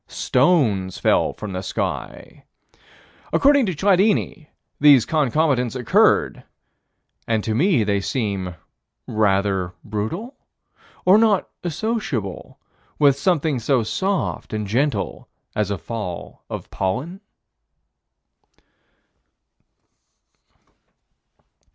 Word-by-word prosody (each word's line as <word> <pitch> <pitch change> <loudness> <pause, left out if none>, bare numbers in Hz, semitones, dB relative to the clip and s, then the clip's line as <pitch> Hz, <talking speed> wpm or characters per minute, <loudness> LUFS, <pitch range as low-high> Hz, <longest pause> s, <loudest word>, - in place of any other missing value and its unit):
Stones 125 - +1
fell - - +2
from 105 -3 -7
the 90 - -3
sky. - - -5 0.9
According 280 -4 +4
to 185 - -2
Chladni, 190 -2 +1 0.3
these 140 -5 +6
concomitants 140 -4 +1
occurred, 125 -3 +2 0.8
and 110 -2 0
to 110 - -1
me 145 - +3
they 100 -1 0
seem 100 -6 -3 0.5
rather 100 -3 0
brutal? 115 - -4 0.7
or 190 +4 +6
not 215 -4 +3 0.2
associable 170 - -3 0.4
with 140 -2 +4
something 155 -3 0
so 120 +1 +1
soft 190 - -2
and 105 -1 -2
gentle 135 +9 -1 0.3
as 105 -2 0
a 100 - -2
fall 95 -2 -7
of - - -7
pollen? 130 - -3
125 Hz, 90 wpm, -21 LUFS, 105-175 Hz, 0.9 s, these